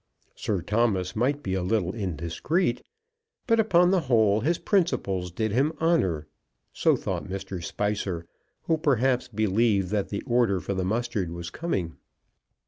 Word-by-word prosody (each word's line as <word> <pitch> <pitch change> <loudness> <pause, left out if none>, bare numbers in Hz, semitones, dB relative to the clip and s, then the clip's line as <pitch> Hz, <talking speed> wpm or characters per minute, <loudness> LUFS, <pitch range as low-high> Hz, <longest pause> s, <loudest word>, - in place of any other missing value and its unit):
Sir 95 -6 -2
Thomas 100 -4 0
might 140 +6 0
be 95 - -2
a 95 - 0
little 90 -1 0
indiscreet; 100 - -1 0.6
but, 230 -1 +3
upon 180 -5 +4
the 190 - +4
whole, 110 -4 +4
his 160 +9 +1
principles 100 - 0
did 110 +4 -1
him 140 +8 +2
honour. 95 - +1 0.5
So - - +3
thought - - -3
Mr. 95 -2 -5
Spicer, 100 -3 -2 0.4
who, 160 -1 +1
perhaps, 130 -3 +2
believed 105 -3 +1
that 105 -1 -1
the 100 - -4
order 120 -6 +2
for 100 - -3
the 95 -1 -1
mustard 110 -2 -1
was 85 0 -6
coming. 95 - -3
105 Hz, 145 wpm, -26 LUFS, 95-130 Hz, 0.6 s, upon